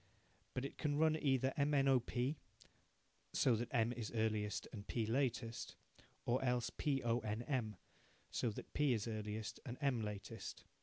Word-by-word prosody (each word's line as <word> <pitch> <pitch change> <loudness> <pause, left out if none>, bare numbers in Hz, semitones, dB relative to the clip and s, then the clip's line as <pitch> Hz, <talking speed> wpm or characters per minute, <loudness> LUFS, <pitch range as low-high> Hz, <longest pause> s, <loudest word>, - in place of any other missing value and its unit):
But 125 - 0
it - - -7
can 145 -2 +1
run 160 0 +5
either 135 -3 +2
M, 145 +1 +3
N, 135 -1 +4
O, 135 -2 +6
P 125 +5 -1 0.9
(so 125 - +4
that 120 +2 -1
M 115 0 +2
is 115 -3 -4
earliest 110 -2 0
and 105 -2 -7
P 115 -2 0
latest) 120 -1 0 0.5
or 125 +2 +2
else 125 -2 +1
P, 140 -3 0
O, 120 0 +3
N, 110 0 -2
M 120 -6 -1 0.6
(so 120 - +1
that 105 - -7
P 145 -3 +4
is 110 -1 -1
earliest 110 -1 -3
and 120 0 -5
M 135 -5 +2
latest). 105 0 -5
120 Hz, 170 wpm, -40 LUFS, 110-135 Hz, 0.9 s, O